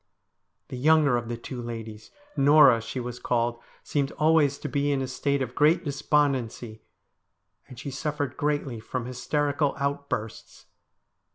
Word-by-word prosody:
'The 130 - -6
younger 150 0 +4
of 120 -1 -3
the 120 - -3
two 120 +1 -7
ladies 115 -2 -7 0.3
Norah 140 -4 +6
she 115 +3 -5
was 125 0 -6
called 120 -1 -1 0.2
seemed 140 -2 -1
always 155 -3 +3
to - - -6
be 145 0 0
in 140 - +1
a 130 - -2
state 140 +2 -1
of 125 -1 -6
great 155 +6 +3
despondency, 135 -6 -1 0.9
and 125 - -12
she 140 - -6
suffered 145 -1 -3
greatly 145 -5 -2
from 120 +2 -5
hysterical 145 +3 -1
outbursts. 140 -6 -4
135 Hz, 145 wpm, -26 LUFS, 120-145 Hz, 0.9 s, Norah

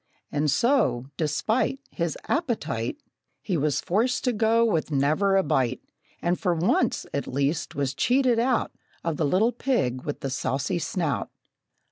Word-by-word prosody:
And 150 +1 +1
so, 205 - +2
despite 215 - 0
His 170 -3 -2
appetite, 220 - -1 0.5
He 190 - -1
was 150 -1 +1
forced 230 +8 0
to 250 - +1
go 225 +1 +3
with 165 -9 0
never 155 +8 +2
a 190 - +3
bite, 130 -3 +1 0.4
And 175 +1 +1
for 180 -4 +1
once, 165 +3 +1
at 140 - -2
least, 140 +4 -1
was 140 -2 -1
cheated 245 - +2
out 245 0 +1 0.3
Of 165 -3 -1
the 155 - +1
little 205 +10 +3
pig 230 - 0
with 145 +1 -5
the 135 - -3
saucy 140 +6 -1
snout. 150 - -2
170 Hz, 150 wpm, -26 LUFS, 140-230 Hz, 0.5 s, go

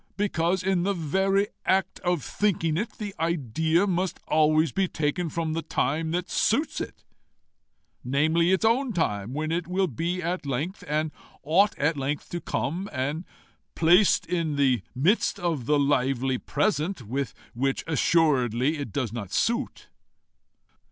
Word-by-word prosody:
Because, 185 -2 0
in 190 -2 +1
the 200 +2 0
very 190 +5 +1
act 190 0 +1
of 175 -6 0
thinking 165 -6 0
it, 210 +5 -2
the 205 -2 -6
idea 160 - +1
must 185 -1 -1
always 155 0 +3
be 190 +5 +1
taken 160 +2 -1
from 160 0 -2
the 165 - -1
time 160 +2 -1
that 180 +3 -2
suits 285 +9 +1
with - - -3
it - - -29 1.0
namely, 160 +7 +2
its 190 +3 +2
own 240 +2 +2
time, 105 - -1
when 155 +3 -2
it 170 0 -1
will 185 +1 +1 0.4
at 175 -1 -2
length, 155 +9 -3
and 155 +1 0 0.3
ought 185 +8 +3
at 150 +2 +1
length 140 +2 -3
to 175 - -3
come 175 +7 -2
and 145 +6 -2 0.5
placed 175 +5 +4
in 165 -4 -1
the 135 -4 +2
midst 190 - +2
of 165 -9 -2
the 150 - +4
lively 135 -2 +1
present, 155 0 -1
with 130 +4 -3 0.2
which 135 +3 -1
assuredly 145 -4 +2
it 140 -7 -5
does 120 -4 -2
not 100 -6 -6
suit. 235 - -1
160 Hz, 150 wpm, -26 LUFS, 140-185 Hz, 1.0 s, placed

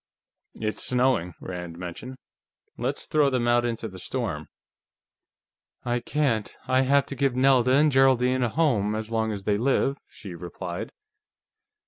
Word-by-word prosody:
"It's 110 -1 -3
snowing," 125 -10 +1
Rand 90 -2 -7
mentioned. 90 +9 -7 0.6
"Let's 130 +4 -3
throw 150 -2 +3
them 125 -3 0
out 120 0 +3
into 115 -1 -3
the 95 -3 -10
storm." 95 - -3 1.4
"I 120 0 0
can't. 125 -6 -1
I 130 0 +3
have 140 +1 +3
to 140 - -7
give 135 -1 +1
Nelda 130 -1 +4
and 150 +2 +4
Geraldine 130 -1 +3
a 120 - +1
home, 110 -8 +1
as 110 +1 -5
long 110 -1 0
as 100 -2 -5
they 100 0 +1
live," 135 +2 +1
she 95 -4 -10
replied. 85 +1 -6
120 Hz, 145 wpm, -26 LUFS, 105-130 Hz, 1.4 s, Nelda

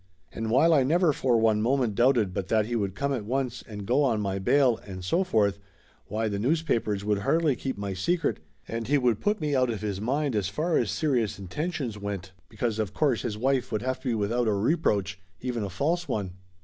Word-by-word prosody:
And 110 0 -4
while 140 +8 +5
I 145 - +5
never 160 +4 +3
for 125 -3 +2
one 110 -1 +3
moment 125 -1 +1
doubted 120 -4 +3
but 95 0 -3
that 110 0 +2
he 120 +2 -3
would 100 -4 -1
come 140 +4 -1
at 120 -5 -2
once 125 +1 -2
and 105 -2 -7
go 125 +7 +2
on 120 -6 +2
my 100 -1 -2
bail, 125 +4 +3
and 95 -2 -9
so 170 - +2
forth, 100 - +1 0.5
why 110 +2 -1
the 100 -1 -2
news 155 +9 +1
papers 105 -8 -1
would 105 -1 +1
hardly 150 +5 +2
keep 130 -2 -4
my 100 -1 -3
secret, 115 - 0 0.3
and 115 0 -4
he 145 +2 +3
would 125 -5 +2
put 210 +1 +1
me 150 -3 0
out 130 -1 +2
of 110 -4 -3
his 100 -2 -3
mind 135 +3 0
as 100 -3 0
far 160 - -1
as - - 0
serious 125 -9 0
intentions 120 - -4
went, 100 -2 -5 0.2
because 110 0 -2
of 105 -3 -2
course 140 -7 +2
his 110 -4 -3
wife 130 +2 0
would 110 - -1
have 130 0 -2
to 130 - -7
be 115 - +1
without 115 +3 0
a 110 - +3
reproach, 100 - 0 0.2
even 125 -3 -3
a 100 - -3
false 160 - -1
one. 105 -8 -2
115 Hz, 225 wpm, -27 LUFS, 105-140 Hz, 0.5 s, while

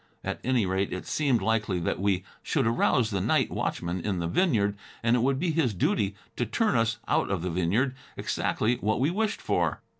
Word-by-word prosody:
At - - -3
any 125 -4 +2
rate, 95 +1 0
it 90 - -4
seemed 135 -7 +1
likely 105 -4 +1
that 85 - -1
we 95 -2 +1 0.2
should 140 -6 0
arouse 115 0 +2
the 95 -2 0
night - - +2
watchman 85 +2 -2
in 100 0 -1
the 85 - -2
vineyard 105 - +2 0.3
and 115 +1 +4
it 120 - +2
would 135 +2 +2
be 170 +3 0
his 145 -10 +1
duty 100 +2 +1 0.2
to 120 - +1
turn 215 - +1
us 115 -1 +2
out - - +1
of 95 -4 -1
the 90 - -2
vineyard, 95 +10 +1 0.2
exactly 120 +3 0
what 110 +2 0
we 140 +6 +2
wished 215 +3 -1
for. - - 0
110 Hz, 205 wpm, -27 LUFS, 95-130 Hz, 0.3 s, and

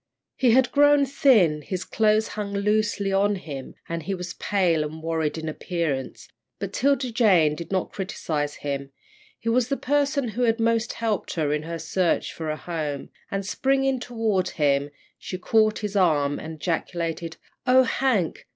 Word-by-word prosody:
He 255 - +3
had 250 +1 +4
grown 290 0 +5
thin; 215 - +4
his 185 +4 -4
clothes 215 +1 +2
hung 205 -1 -4
loosely 205 -1 +1
on 200 +1 +3
him, 140 -8 -7
and 170 -1 -3
he 195 +4 -3
was 180 -1 -6
pale 180 -6 +1
and 155 +1 -7
worried 160 -1 -1
in 160 0 -5
appearance, 155 -4 -3 0.3
but - - -5
'Tilda 275 -2 +1
Jane 190 -10 +4
did 170 +3 -7
not 185 -2 -1
criticise 155 -6 -3
him. 140 -1 -3 0.5
He 230 - -10
was 235 0 +2
the 275 +1 -1
person 280 -2 +1
who 225 +4 -4
had 230 -1 +2
most 230 0 +1
helped 225 -3 -2
her 150 -3 0
in 150 - -1
her 165 +2 -5
search 170 +2 0
for 160 -1 -5
a 155 - -2
home, 155 -5 -4 0.2
and, 195 0 -3
springing 270 +4 +1
toward 225 -6 -1
him, 140 -2 +1 0.3
she 185 - -5
caught 215 +3 +2
his 205 0 -4
arm 150 -7 +2
and 160 0 -7
ejaculated: 165 0 -3 0.3
"Oh, 260 +1 +6
Hank! 235 -8 0
190 Hz, 170 wpm, -25 LUFS, 160-230 Hz, 0.5 s, Oh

